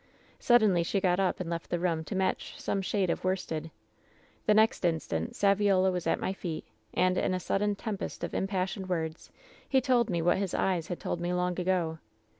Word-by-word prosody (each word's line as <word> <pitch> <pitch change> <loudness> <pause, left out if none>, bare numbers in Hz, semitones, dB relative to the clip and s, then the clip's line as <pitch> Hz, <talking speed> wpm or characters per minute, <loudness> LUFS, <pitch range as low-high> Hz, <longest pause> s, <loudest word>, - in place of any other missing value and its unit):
Suddenly 215 -8 +4
she 185 +4 0
got 185 -1 +2
up 190 -2 +1
and 185 - -3
left 170 0 -4
the 175 - 0
room 170 -2 0
to 200 - -5
match 190 0 -1
some 195 - -1
shade 190 -2 0
of - - -3
worsted. 165 -4 -2 0.8
"The 210 - +5
next 220 -1 +3
instant 160 - -1
Saviola 195 -2 +3
was 180 -2 -3
at - - +2
my 190 - -1
feet, 170 -4 -5 0.3
and, 185 0 +2
in 185 - +1
a - - -1
sudden 205 +3 0
tempest 205 -1 -5
of - - -3
impassioned 190 0 -2
words, 160 -2 -3 0.4
he 265 - +4
told 245 -3 +2
me 175 -3 0
what 175 +2 +3
his 195 -3 -2
eyes 175 -4 0
had 175 - -4
told 170 - -3
me 175 +1 -1
long 180 0 0
ago. 175 -3 0
185 Hz, 200 wpm, -29 LUFS, 175-195 Hz, 0.8 s, The